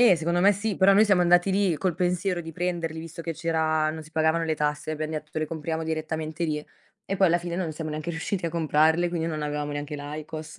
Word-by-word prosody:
E 240 -7 +7
secondo 170 +2 0
me 200 +3 +6
sì, 205 +1 -2
però 195 +1 +6
noi 210 +2 +7
siamo 200 -4 +4
andati 175 +2 +4
lì 190 -3 +2
col 180 +1 0
pensiero 180 +1 0
di 165 -1 -8
prenderli 170 -1 -2
visto 165 0 -8
che 165 0 -3
c'era 160 -1 +1
non 160 0 -6
si 155 - -15
pagavano 160 +1 +2
le 160 -1 0
tasse, 150 +1 -1
abbiam 155 0 -3
detto: 155 0 -4
"Le 155 - 0
compriamo 160 0 -3
direttamente 160 0 -3
lì." 150 -2 -2 0.5
E 195 - +1
poi 190 - +5
alla 170 0 +3
fine 175 0 -4
non 175 -4 -2
siamo 155 0 -5
neanche 155 +2 -4
riusciti 170 +2 -2
a - - -2
comprarle, 160 +1 +3
quindi 170 -2 -2
non 155 -2 -3
avevamo 150 0 -2
neanche 145 +1 -4
l'IQOS 155 +2 -7
160 Hz, 240 wpm, -26 LUFS, 155-175 Hz, 0.5 s, E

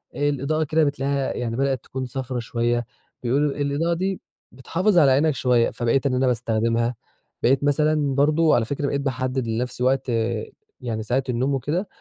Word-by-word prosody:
آآ، 145 0 +1
الإضاءة 145 +3 0
كده 155 +1 +2
بتلاقيها 140 -1 -1
يعني 115 -2 -3
بدأت 135 0 0
تكون 130 0 -5
صفرا 130 0 -4
شوية، 120 0 -1 0.4
بيقولوا 140 +4 +1
الإضاءة 145 +4 0
دي 190 +2 -2 0.3
بتحافظ 175 - 0
على 145 -5 +6
عينك 145 +3 +3
شوية، 125 -3 +2
فبقيت 120 +3 0
إن 135 - +1
أنا 130 +1 +2
باستخدمها، 115 0 0 0.5
بقيت 135 +3 +3
مثلًا 145 -1 +2
برضو 155 +3 +3
على 115 -2 +3
فكرة 140 +3 -2
بقيت 140 0 -1
باحدد 130 -2 -2
لنَفسي 125 +2 -2
وقت 130 0 +1 0.7
يعني 110 -3 -3
ساعة 125 +4 0
النوم 130 +3 0
وكده، 160 +9 -1
135 Hz, 165 wpm, -23 LUFS, 125-145 Hz, 0.7 s, على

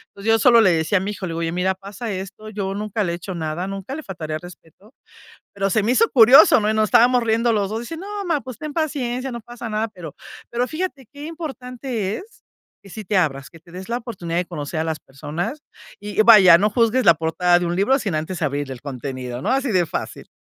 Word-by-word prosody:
Pues, 200 - -11
yo 225 0 +4
solo 235 +2 +6
le 190 - +5
decía 160 +3 +1
a - - -5
mi 200 +2 -3
hijo: 195 -2 -6
"Oye 165 0 -3
mira 185 +2 0
pasa 200 +4 -7
esto 195 +3 -7
yo 195 -2 -4
nunca 210 +1 -2
le 175 - -1
he - - -2
hecho 180 +1 -7
nada 160 +3 -3
nunca 195 +5 -6
le 315 - -6
faltaría 155 - -5
el - - -14
respeto". 180 - -15 0.6
Pero 195 0 -1
se 215 +2 +2
me 225 +4 +1
hizo 455 - +3
curioso 250 +1 +7
¿no? 210 - 0
Y 220 - 0
nos 215 0 +3
estábamos 245 +3 +5
riendo 230 +1 +2
los 200 -3 0
dos 220 - -2
y - - -6
dice: 325 +7 -7
"No 405 +3 -6
ma, 330 -4 0
pues, 255 -3 -9
ten 305 -1 -6
paciencia 265 -5 -2
no 235 - -6
pasa 240 +1 -8
nada". 215 +1 -1
Pero 180 -8 -10 0.4
pero 240 +1 -1
fíjate 310 -6 -4
qué 290 +1 -9
importante 255 - -5
es 430 +2 -15 0.4
que 195 - -15
sí 215 +3 -8
te 200 +1 -1
abras 140 -7 0
que 165 - -16
te 170 - -20
des 185 +2 -9
la 235 +1 -1
oportunidad 180 -8 -4
de 180 - 0
conocer 155 -1 -5
a 160 - -1
las 160 -1 -3
personas 155 - -5 0.4
y 205 +1 -2
vaya 195 -7 +8
no 205 +3 +2
juzgues 235 +3 +2
la 170 - +7
portada 175 +3 +2
de 175 - -1
un 170 +1 -2
libro 205 +8 +3
sin 200 -8 -3
antes 160 +3 -4
abrir 145 -2 -2
el 125 - -9
contenido 130 -3 -6
¿no? 210 - -1
Así 270 0 +1
de 180 -4 +2
fácil. - - -6
205 Hz, 245 wpm, -21 LUFS, 170-240 Hz, 0.6 s, vaya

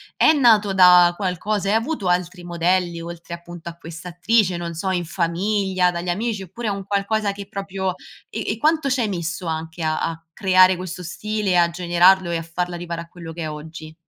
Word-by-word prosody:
è - - +5
nato 220 -9 +4
da 180 -1 +7
qualcosa, 200 +1 -2
hai 215 - +3
avuto 225 - -1
altri 180 0 -1
modelli, 175 0 0
oltre 170 0 -8
appunto 170 0 -9
a 165 - -10
questa 165 +1 -9
attrice, 185 +2 +2
non 170 -1 -5
so, 190 +4 -2
in 180 -2 -1
famiglia, 185 +2 0
dagli 175 +1 -4
amici, 210 +2 -2
oppure 205 +6 -6
è - - 0
un 195 -1 -5
qualcosa 200 +1 0
che 200 -1 -9
proprio 195 -2 -3 0.4
e - - -3
e 220 - -8
quanto 310 +1 +2
ci 260 -1 +1
hai 220 - 0
messo 175 0 -4
anche 160 +1 -4
a 155 0 0
a 165 0 -3
creare 185 -1 +5
questo 180 0 -6
stile, 210 +4 -2
e - - +3
a 170 -1 +4
generarlo, 175 +1 +3
e 170 - 0
a - - -4
farla 175 +2 -3
arrivare 170 -1 -5
a 170 - -10
quello 165 -2 -9
che 170 - -7
è 155 - -3
oggi? 155 +1 -9
180 Hz, 210 wpm, -22 LUFS, 170-200 Hz, 0.4 s, da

